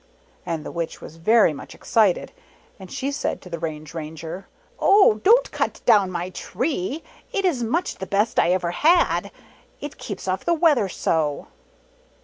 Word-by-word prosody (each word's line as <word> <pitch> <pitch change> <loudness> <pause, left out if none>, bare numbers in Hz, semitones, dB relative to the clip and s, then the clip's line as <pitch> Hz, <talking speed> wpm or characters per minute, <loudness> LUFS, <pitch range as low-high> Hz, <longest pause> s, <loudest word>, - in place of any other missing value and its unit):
And 165 -3 -3
the - - -6
Witch 170 -1 -4
was 160 - -11
very 210 0 +4
much 140 - -10
excited, 210 -5 +1 0.5
and 190 -1 -11
she 270 +1 -2
said 280 - -2
to 180 - -12
the 170 - -4
Range 155 -1 -5
Ranger, 160 +3 -7 0.2
" - - -34
Oh! 390 - +5
Don't 480 +4 +5
cut - - -2
down 205 -5 +5
my 180 0 -4
Tree; 270 - -3 0.3
it 400 -4 -1
is 310 -10 +1
much 325 +11 -1
the 190 - -5
best 205 +3 +1
I 170 - +3
ever 180 -1 +1
had; 330 - +3 0.5
it 290 0 -8
keeps 200 -3 -6
off 185 0 -1
the 340 - +2
weather 300 - +3
so 155 -5 -1
195 Hz, 170 wpm, -23 LUFS, 170-280 Hz, 0.5 s, Oh